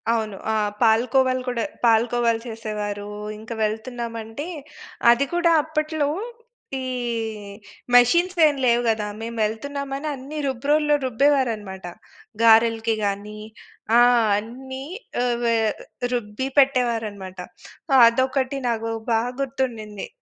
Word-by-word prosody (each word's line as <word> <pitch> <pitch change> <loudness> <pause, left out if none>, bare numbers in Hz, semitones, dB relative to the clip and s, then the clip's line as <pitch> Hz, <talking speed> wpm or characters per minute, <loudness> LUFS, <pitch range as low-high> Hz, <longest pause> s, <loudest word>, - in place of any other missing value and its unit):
అవును. 220 -3 0 0.2
ఆ! - - +1 0.3
పాలు 225 0 +4
కోవలు 260 -1 +3
కూడా 245 -2 -1 0.2
పాలు 225 0 +5
కోవలు 235 -1 +2
చేసేవారు, 210 -2 -5 0.3
ఇంకా 225 +2 -7
వెళ్తున్నామంటే 230 +2 -4 0.7
అది 240 +4 +3
కూడా 345 -1 +3
అప్పట్లో, 310 -1 -1 0.8
ఈ - - -4 1.1
మెషిన్స్ 345 +10 +4
ఏం 295 - 0
లేవు 240 -1 +4
గదా! 220 -2 0
మేము 230 +1 -6
వెళ్తున్నామని 275 +6 -3
అన్ని 275 +4 -8
రుబ్రోల్లో 295 +4 +2
రుబ్బేవారన్నమాట. 230 -7 0 0.6
గారెలకి 225 0 +4
గానీ, 205 +1 -4 0.6
ఆ! - - +7 0.4
అన్ని 260 +5 -7 0.4
ఆహ్, 240 -1 0
వే 230 -1 +2 0.6
రుబ్బి 235 +2 -3
పెట్టేవారన్నమాట. 225 -8 +1 0.7
అదొకటి 260 +3 +1
నాకు 225 -1 -2 0.2
బా 225 0 +3 0.2
గుర్తుండింది. 235 -6 -3
235 Hz, 105 wpm, -23 LUFS, 220-265 Hz, 1.1 s, ఆ